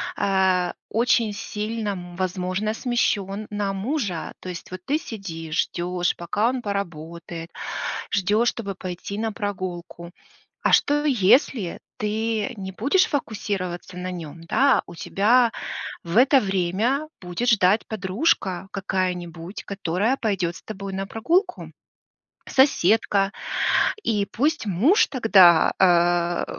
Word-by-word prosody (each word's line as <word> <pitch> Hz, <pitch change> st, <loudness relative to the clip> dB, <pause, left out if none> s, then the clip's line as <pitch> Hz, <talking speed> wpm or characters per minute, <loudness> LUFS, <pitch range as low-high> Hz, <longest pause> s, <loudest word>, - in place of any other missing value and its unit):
а, 190 Hz, -2 st, +1 dB
очень 230 Hz, -1 st, +2 dB
сильно, 215 Hz, +1 st, -4 dB
м, 175 Hz, -3 st, -6 dB
возможно, 185 Hz, +3 st, -2 dB
смещён 215 Hz, -4 st, -1 dB
на 205 Hz, -1 st, -2 dB
мужа. 205 Hz, -, -3 dB
То 185 Hz, -, -8 dB
есть 175 Hz, -, -7 dB
вот 185 Hz, 0 st, -7 dB
ты 300 Hz, +3 st, +1 dB
сидишь, 165 Hz, -, -3 dB
ждёшь, 175 Hz, 0 st, -2 dB
пока 205 Hz, +7 st, 0 dB
он 255 Hz, -1 st, -2 dB
поработает, 170 Hz, -4 st, -5 dB, 0.6 s
ждёшь, 210 Hz, +5 st, +2 dB
чтобы 200 Hz, -4 st, -5 dB
пойти 185 Hz, +2 st, -6 dB
на 220 Hz, 0 st, -1 dB
прогулку. 180 Hz, -4 st, -5 dB, 0.5 s
А -, -, +2 dB
что, 295 Hz, +1 st, +4 dB
если 235 Hz, -, +3 dB, 0.2 s
ты 215 Hz, 0 st, -1 dB
не 190 Hz, -1 st, -5 dB
будешь 280 Hz, -, +2 dB
фокусироваться 195 Hz, -9 st, -3 dB
на 185 Hz, 0 st, -4 dB
нём? 165 Hz, -2 st, -8 dB
Да, 270 Hz, +11 st, +3 dB
у 175 Hz, -, -10 dB
тебя 230 Hz, +7 st, +3 dB, 0.5 s
в 170 Hz, +5 st, -2 dB
это 270 Hz, +2 st, +6 dB
время 205 Hz, -, 0 dB
будет 180 Hz, +7 st, -2 dB
ждать 205 Hz, -1 st, +3 dB
подружка 195 Hz, -, 0 dB
какая-нибудь, 180 Hz, -2 st, -3 dB
которая 200 Hz, +6 st, -1 dB
пойдёт 185 Hz, -6 st, -1 dB
с -, -, -11 dB
тобой 195 Hz, -2 st, -7 dB
на 195 Hz, 0 st, -3 dB
прогулку, 335 Hz, -, 0 dB, 0.8 s
соседка, 210 Hz, -6 st, +3 dB, 0.7 s
и 210 Hz, -, 0 dB
пусть 295 Hz, -1 st, 0 dB
муж 235 Hz, -, +4 dB
тогда, 190 Hz, -, +5 dB
а, 175 Hz, -1 st, +3 dB
195 Hz, 120 wpm, -24 LUFS, 180-225 Hz, 0.8 s, это